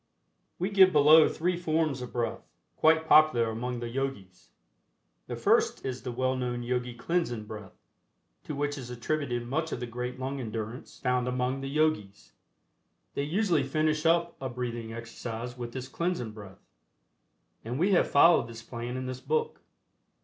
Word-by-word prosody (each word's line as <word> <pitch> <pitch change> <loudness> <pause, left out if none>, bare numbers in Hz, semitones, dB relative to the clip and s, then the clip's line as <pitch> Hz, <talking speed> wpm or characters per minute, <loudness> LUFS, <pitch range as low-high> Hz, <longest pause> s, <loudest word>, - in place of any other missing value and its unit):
We 185 +4 -2
give 190 -2 +7
below 155 +1 +7
three 180 +2 -1
forms 155 -5 0
of 125 - -6
breath, 120 -1 -3 0.3
quite 160 0 +4
popular 140 -9 +5
among 120 +2 -4
the 120 - -3
Yogis. 115 -8 -5 0.8
The - - -4
first - - +2
is 130 -1 -3
the 125 0 -4
well 130 +2 0
known 125 -1 -2
Yogi 125 0 -2
Cleansing 120 -5 -1
Breath, 105 -2 -10 0.7
to 150 - -4
which 145 0 -2
is 125 -2 -8
attributed 125 0 -2
much 155 +6 -2
of - - -3
the 125 - -3
great 125 +2 -5
lung 135 +1 -3
endurance 115 0 -6
found 125 -1 0
among 125 +1 -1
the 135 - -4
Yogis. 145 -10 -1 0.8
They - - -1
usually 170 +1 +1
finish 155 +3 0
up 170 +1 +2
a 130 - -3
breathing 120 -2 -4
exercise 115 +1 -6
with 120 -1 -6
this 130 0 -6
Cleansing 170 -8 -2
Breath, 100 -3 -12 1.0
and 120 +3 -4
we 185 +6 +2
have 185 - +3
followed 145 -4 +6
this 115 -1 -10
plan 120 +1 -5
in 130 - -4
this 130 0 -5
book. 460 0 -1
130 Hz, 165 wpm, -29 LUFS, 120-155 Hz, 1.0 s, give